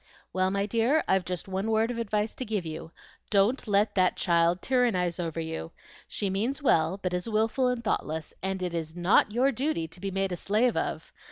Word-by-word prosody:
"Well, 185 0 +2
my 200 +1 0
dear, 230 +8 +2
I've 190 -2 +2
just 180 +1 -4
one 190 +3 -2
word 220 +2 +2
of 235 - -4
advice 210 -1 -1
to - - -5
give 210 -6 -2
you. 160 0 -6 0.4
Don't 215 +5 +2
let 205 +1 +2
that 185 -1 +3
child 170 +1 +2
tyrannize 205 -10 +1
over 165 -2 -3
you. 160 - -5 0.3
She 205 - -2
means 220 +9 -1
well, 170 - +2
but 180 -1 -1
is 180 +4 -2
wilful 225 +4 +1
and 250 -2 -1
thoughtless, 160 -7 -2
and 190 0 -2
it 180 -1 -2
is 160 -1 -4
NOT 175 +4 +3
your 255 +5 +3
duty 270 - -1
to 180 - -7
be 195 +1 -3
made 195 0 -1
a - - -1
slave 215 +7 +1
of. - - -3
195 Hz, 205 wpm, -28 LUFS, 175-225 Hz, 0.4 s, that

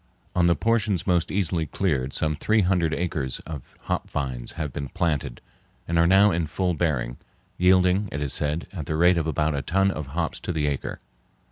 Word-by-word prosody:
On 90 -1 +4
the 85 - +4
portions 110 -5 +1
most 90 -3 +2
easily 90 -4 0
cleared 70 -7 -1
some 80 +2 0
three 110 +8 +2
hundred 90 -4 +2
acres 75 -7 -2
of 75 -6 -9
hop - - -3
vines 65 -4 -4
have 75 -5 -4
been 70 -2 -4
planted 80 -9 -2 0.5
and 85 0 +1
are 85 - +5
now 95 +3 +6
in 85 -2 0
full 90 +3 0
bearing, 70 -8 -1 0.4
yielding, 90 +2 +4
it 70 - -3
is 70 -2 -2
said, 75 +3 -1
at 80 -7 -5
the 80 - -1
rate 85 +2 +4
of 80 - -2
about 80 -1 +1
a 70 - -1
ton 95 +6 +2
of 75 -6 -5
hops 80 +4 -2
to - - -4
the 80 -3 0
acre. 70 -2 -3
85 Hz, 200 wpm, -25 LUFS, 75-90 Hz, 0.5 s, now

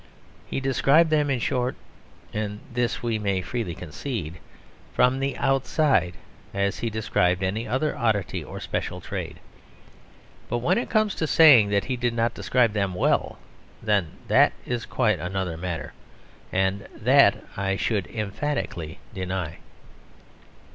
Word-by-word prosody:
He - - -2
described 135 +4 +3
them, 150 -2 +2
in 135 - +1
short 125 +1 -1 0.6
(and 105 -1 -3
this 120 0 -1
we 115 -2 0
may 100 -3 -1
freely 100 -4 -3
concede), 85 - -5 0.6
from 125 +1 +3
the 135 0 -2
outside, 135 - +2 0.4
as 100 0 0
he 115 - -1
described 95 -4 +1
any 105 +5 -1
other 130 +7 0
oddity 105 -7 0
or - - -8
special - - -3
trade. - - -6 1.1
But 120 - 0
when 125 - +2
it 240 - -4
comes 215 -2 +2
to 160 - -2
saying 140 -11 +7
that 100 -1 +2
he 130 -1 -2
did 120 -1 -1
not 115 0 +1
describe 120 -4 +2
them 100 -3 -1
well, - - +1 0.4
then 100 -7 0
that - - +5
is 120 -1 -3
quite 110 -7 +1
another 90 -1 -3
matter, 85 -1 -5 0.6
and 95 +1 0
that - - +4
I 95 0 0
should 100 -1 -1
emphatically 105 - -3 0.2
deny. 90 -3 -4
110 Hz, 140 wpm, -25 LUFS, 95-125 Hz, 1.1 s, saying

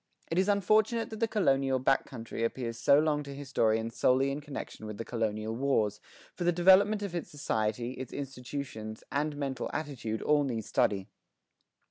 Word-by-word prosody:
It 165 - +2
is 190 - +2
unfortunate 215 +3 +2
that 220 - -6
the 230 - +2
colonial 135 - +2
back 135 +1 +2
country 115 -2 -5
appealed 115 0 -2
so 120 +4 +5
long 150 -1 +2
to 140 -1 -8
historians 115 -5 0
solely 135 +2 +3
in 145 +2 -4
connection 145 -6 -7
with 105 -1 -6
the 115 - -5
colonial 110 -1 -2
wars, 115 -6 +1 0.3
for 175 - -4
the 175 - +4
development 190 +4 +5
of 200 -4 -4
its 170 - -4
society, 120 -4 -1
its 130 -1 -7
institutions 125 -5 -6
and 145 +1 -1
mental 135 -2 -3
attitude 125 -8 -4
all 150 -1 +3
need 115 -6 -3
study. 95 -2 +1
135 Hz, 170 wpm, -30 LUFS, 115-155 Hz, 0.3 s, so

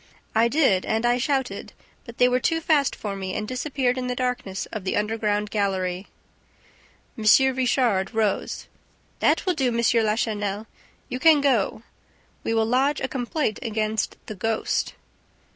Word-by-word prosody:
"I 225 +1 +4
did 235 -9 +3
and 220 +2 -1
I 240 +1 +3
shouted, 270 0 -2 0.3
but 235 -2 -11
they 250 - +5
were 250 0 +2
too 325 +6 +1
fast 305 -4 +2
for 205 -2 -5
me 190 -1 -4
and 215 0 -3
disappeared 255 0 -1
in 250 - -3
the 250 - -2
darkness 245 -7 -2
of 215 -4 -5
the 185 - -1
underground 210 -1 -1
gallery." 190 -2 -1 1.1
M. 220 - -6 0.3
Richard 245 -6 +1
rose. 220 -3 -1 0.5
"That - - +2
will 365 - +2
do, 275 -6 0
M. 235 -1 0 0.3
Lachenel. 210 -1 -1 0.4
You 255 - -4
can 315 0 +6
go... 245 -6 +1 0.6
We 225 - -1
will 225 0 +3
lodge 265 +5 +2
a 265 - -1
complaint 255 -2 -2
against 220 -2 -2
THE - - -6
GHOST." 220 +3 -1
225 Hz, 155 wpm, -24 LUFS, 210-255 Hz, 1.1 s, can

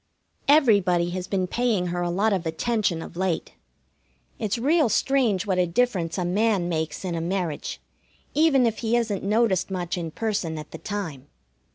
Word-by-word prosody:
Everybody 200 - +4
has 185 0 -4
been 190 -1 0
paying 225 -2 0
her 175 - -1
a 175 - 0
lot 200 +5 +1
of 180 -3 -1
attention 175 -1 0
of - - -11
late. 180 -2 -1 0.9
It's 215 0 -1
real 290 +2 +3
strange 230 -5 +2
what 190 -3 0
a 180 - +3
difference 180 -4 0
a 180 - -1
man 200 0 +1
makes 160 +1 -3
in 180 - -2
a 165 - -2
marriage, 170 - -3 0.5
even 290 -4 +4
if 225 -1 0
he 235 0 +1
isn't 220 -5 -1
noticed 210 -2 +2
much 180 -2 -3
in 165 -1 -4
person 195 -4 -2
at 155 0 -8
the - - -8
time. 165 -11 -5
190 Hz, 175 wpm, -25 LUFS, 175-225 Hz, 0.9 s, Everybody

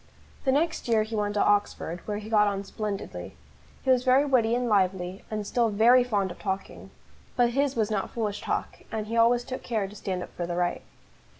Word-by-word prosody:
The 265 - +4
next 315 +2 0
year 225 -2 +3
he 220 +1 -5
went 205 -1 -1
to 205 - +3
Oxford, 205 -4 0
where 210 -1 -2
he 210 0 -7
got 210 -2 +4
on 200 -1 -1
splendidly. 195 - -5 0.5
He 260 - +3
was 250 -1 +3
very 260 +2 +4
witty 240 -5 +3
and 245 0 0
lively, 190 -3 0
and 215 -1 -3
still 235 +2 +1
very 235 +4 +5
fond 205 -6 0
of - - -11
talking; 195 -1 -4 0.5
but 240 -1 +3
his 275 +2 +1
was 220 -2 0
not 200 -2 -1
foolish 210 -3 -3
talk, - - -3
and 220 -1 -2
he 225 +2 -4
always 235 +1 +4
took 255 +1 -6
care 220 -5 -1
to 205 - -12
stand 185 -3 -3
up - - -11
for 175 - -3
the 175 - -3
right. 175 0 0
215 Hz, 215 wpm, -27 LUFS, 200-240 Hz, 0.5 s, very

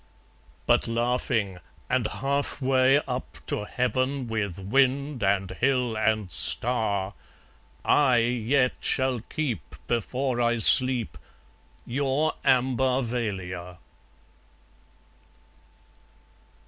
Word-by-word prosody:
But - - +2
laughing 115 -4 -1 0.3
and 125 -4 0
half 140 +6 -2
way 130 0 +3
up 125 0 -5
to 105 - -3
heaven, 130 +3 -1
With 105 -6 -3
wind 135 +6 +1
and 95 -1 +1
hill 125 -4 0
and 110 -3 0
star, 100 - +1 0.7
I 130 -4 +4
yet 125 +2 +1
shall 130 -2 +1
keep, 120 - -5
before 120 +2 -1
I 120 0 +2
sleep, 125 - +4 0.7
Your 140 +4 0
Ambarvalia. 120 -9 -1
120 Hz, 85 wpm, -26 LUFS, 105-130 Hz, 0.7 s, I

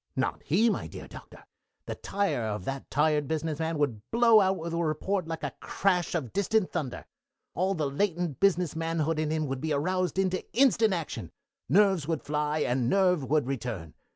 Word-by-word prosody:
Not - - -1
he, 200 +10 +2
my 220 - 0
dear - - -9
Doctor. - - -13 0.4
The - - -4
tire 200 -10 -1
of 105 -3 -3
that 135 0 -5
tired 150 0 +2
business 160 0 -2
man 160 0 -1
would 135 -8 0
blow 230 -2 +6
out 190 0 +2
with 165 +1 -5
a - - -1
report 165 +4 -1
like 165 0 -5
a - - -3
crash 180 -3 0
of 140 -9 -3
distant 200 0 +1
thunder. 150 -8 -4 0.5
All 190 +3 0
the 155 -3 -1
latent 175 0 -1
business 180 -5 +2
manhood 165 -1 -1
in 155 -1 0
him 155 0 0
would 135 -2 -4
be 155 -1 -1
aroused 180 +4 0
into 185 -1 +1
instant 230 -5 +4
action. 165 -3 -5 0.4
Nerves 190 -6 +4
would 165 -2 -2
fly, 150 +1 -1
and 125 -2 +1
nerve 180 -6 +3
would 150 -2 +2
return. 115 - -4
160 Hz, 185 wpm, -28 LUFS, 145-190 Hz, 0.5 s, blow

